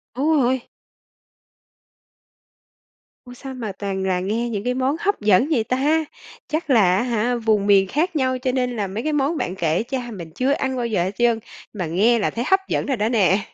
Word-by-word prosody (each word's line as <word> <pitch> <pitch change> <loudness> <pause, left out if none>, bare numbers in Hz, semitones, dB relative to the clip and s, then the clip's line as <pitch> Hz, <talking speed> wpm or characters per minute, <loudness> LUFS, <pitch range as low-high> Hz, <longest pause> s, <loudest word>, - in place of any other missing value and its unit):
Đúng 295 +5 +1
rồi. 250 0 0 2.6
Ôi 245 0 -12
sao 265 +1 -8
mà 235 -5 -5
toàn 195 0 -4
là 185 -1 0
nghe 220 +6 -2
những 205 -3 -3
cái 250 0 0
món 260 +3 0
hấp 405 - -1
dẫn 210 +4 +4
vậy 245 -8 +2
ta? 290 +7 +1 0.4
Chắc 310 0 -3
là, 200 -8 +5
á 205 - +1
hả, 240 0 0
vùng 220 -3 +1
miền 195 -1 +5
khác 335 - -1
nhau 260 -3 +1
cho 255 0 -1
nên 250 -1 -1
là 205 -3 -2
mấy 210 +5 -5
cái 310 - -1
món 295 +3 0
bạn 190 -7 -3
kể 170 +2 0
cha 245 -1 -4
mình 170 -6 -8
chưa 260 +2 +1
ăn 265 -2 -1
bao 245 - -1
giờ 200 -6 0
hết 185 - -2
trơn, 235 -2 +2 0.3
mà 185 -4 -3
nghe 210 +9 +2
là 205 - +1
thấy 235 - -3
hấp 385 - +4
dẫn - - -1
rồi 270 -3 -1
đó 215 +1 0
nè! 205 -4 +3
240 Hz, 215 wpm, -22 LUFS, 200-265 Hz, 2.6 s, là